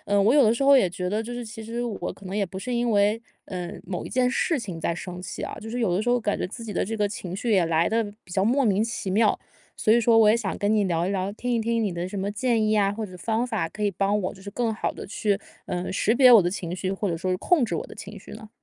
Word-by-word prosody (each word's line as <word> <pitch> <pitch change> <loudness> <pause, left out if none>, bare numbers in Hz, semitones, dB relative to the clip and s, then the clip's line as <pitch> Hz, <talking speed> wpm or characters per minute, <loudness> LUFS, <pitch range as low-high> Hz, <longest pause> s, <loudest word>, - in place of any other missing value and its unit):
呃， 200 0 +3
我 220 +7 +4
有 290 - +7
的 220 -1 +5
时 275 +4 -1
候 280 0 +7
也 190 -9 +3
觉 180 0 -3
得 215 +3 -1
就 235 +2 -7
是 245 0 -5
其 220 +1 -8
实 230 +2 -4
我 225 -4 -4
可 200 - -13
能 190 +2 -4
也 205 - +1
不 190 0 -7
是 250 +4 -3
因 240 0 +1
为， 205 +1 +3 0.3
嗯， 180 -3 -6
某 180 -2 -4
一 - - -6
件 250 0 +2
事 315 +2 +1
情 185 -7 -6
在 170 - -1
生 180 +1 -7
气 175 - -6
啊， - - -4
就 220 - -8
是 245 +2 -3
有 180 -6 +1
的 210 - 0
时 245 - 0
候 245 0 +2
感 210 -2 -1
觉 - - -1
自 230 +4 -8
己 225 - -6
的 200 - 0
这 225 - -4
个 205 -1 +2
情 185 -3 -6
绪 230 +4 -2
也 190 -5 +4
来 165 0 +2
得 225 +1 +1 0.2
比 180 - -18
较 190 +1 +1
莫 260 +6 +3
名 210 -2 +2
其 225 -4 -4
妙。 210 +3 +2 0.3
所 215 - 0
以 235 - +6
说 230 -1 +4
我 215 -1 +6
也 220 - +5
想 205 -5 -3
跟 205 +1 +1
你 210 -2 +3
聊 170 -1 0
一 - - -1
聊、 195 0 -1
听 245 +4 -4
一 235 -1 +2
听 230 +1 0
你 205 - 0
的 175 +1 -3
什 195 +1 -5
么 200 +2 -2
建 225 +1 +1
议 215 - +2
呀 200 -2 +3
或 215 0 -4
者 185 - -11
方 225 +6 -1
法 195 -9 -2
可 210 - -7
以 205 - +2
帮 200 +3 0
我 185 - -3
就 190 - -15
是 200 - -7
更 230 +1 -1
好 - - -2
地 - - -8
去， 205 0 -1 0.2
嗯， 180 0 -3
识 210 +4 +1
别 255 -1 +7
我 225 -5 +9
的 175 - 0
情 180 -2 -4
绪， 190 +1 -2
或 195 +1 -2
者 165 - -1
说 185 +3 -2
是 185 - +1
控 325 - +3
制 175 - -3
我 - - -3
的 - - -11
情 205 +1 -9
绪 - - -13
呢？ 215 - -10
210 Hz, 350 characters per minute, -25 LUFS, 190-230 Hz, 0.3 s, 我